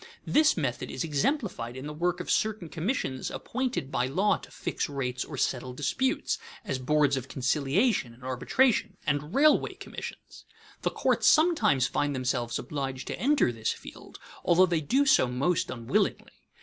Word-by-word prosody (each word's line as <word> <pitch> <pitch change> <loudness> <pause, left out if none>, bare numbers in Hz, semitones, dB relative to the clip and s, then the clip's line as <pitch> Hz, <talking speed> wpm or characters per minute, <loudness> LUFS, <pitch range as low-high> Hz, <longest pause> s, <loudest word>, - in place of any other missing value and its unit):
This 305 -6 +4
method 135 -7 -2
is 130 - -3
exemplified 155 - -1
in 130 - -7
the 150 - -5
work 175 +3 -1
of - - -3
certain 215 -6 0
commissions 165 - -2
appointed 250 - -3
by 125 - +1
law 190 +10 +2
to - - -14
fix - - -3
rates 130 -3 -2
or 145 - -8
settle 125 0 -1
disputes, 150 - -1 0.3
as 130 - -2
boards 145 +1 +2
of 130 0 -5
conciliation 140 - +1
and 120 +2 -17
arbitration 165 - +1
and 145 +2 -1
railway 295 +2 +4
commissions. - - -9 0.4
The - - +1
courts - - +1
sometimes 310 - +4
find 145 +1 -1
themselves 125 -2 -1
obliged 135 -3 -4
to - - -4
enter 280 - +3
this 110 -2 -2
field, - - -12 0.3
although 180 +2 +5
they 170 -3 0
do 265 - +2
so 270 - +5
most 140 +8 0
unwillingly. 115 -2 -1
145 Hz, 160 wpm, -28 LUFS, 130-210 Hz, 0.4 s, although